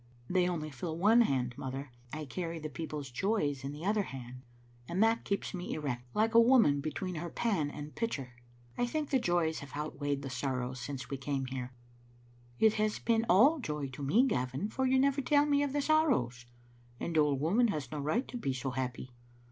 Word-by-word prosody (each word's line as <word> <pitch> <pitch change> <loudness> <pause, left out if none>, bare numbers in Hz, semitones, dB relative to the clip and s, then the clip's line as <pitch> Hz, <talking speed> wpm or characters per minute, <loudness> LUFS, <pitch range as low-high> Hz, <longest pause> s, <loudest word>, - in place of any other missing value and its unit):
'• - - -3
They 180 -1 +3
only 155 -3 -3
fill 160 +5 -4
one 215 +7 +6
hand, 125 - +1
mother; 135 0 -5 0.2
I 155 0 -5
carry 165 +5 -4
the 155 -1 -6
people's 150 -4 -5
joys 145 - 0
in 135 - -3
the 150 +4 -7
other 210 +1 +2
hand, 125 -7 -8 0.5
and 185 +5 +2
that 225 +1 +2
keeps 200 - -2
me 180 -2 -4
erect, 125 -5 -3
like 220 +2 +2
a 230 - +8
woman 230 - +5
between 160 +5 -3
her 170 +1 -4
pan 185 -8 0
and 145 +1 -8
pitcher. 140 - -3 0.5
I 245 - +2
think 300 +3 -2
the 265 - +4
joys 175 -6 +1
have 140 -2 -10
outweighed 145 -2 -2
the 135 - -4
sorrows 130 -1 -2
since 135 +2 -6
we 140 - -2
came 135 0 -2
here." 130 -1 -5 0.5
" 120 0 -28
It 215 - +2
has 215 0 +1
been 230 0 +1
all 265 - +6
joy 150 - -3
to 130 +2 -9
me, 200 - +4
Gavin, 130 - -1
for 260 +4 0
you 260 +1 +3
never 275 +1 +3
tell 290 +2 +4
me 285 -1 +3
of 285 -1 0
the 290 0 0
sorrows. 130 - +2 0.5
An 170 - -3
old 150 -3 +3
woman 200 - +3
has 150 - -3
no 150 - -3
right 155 - 0
to 245 - -5
be 135 - -1
so 130 +1 -3
happy." 125 0 -4
155 Hz, 210 wpm, -32 LUFS, 135-220 Hz, 0.5 s, a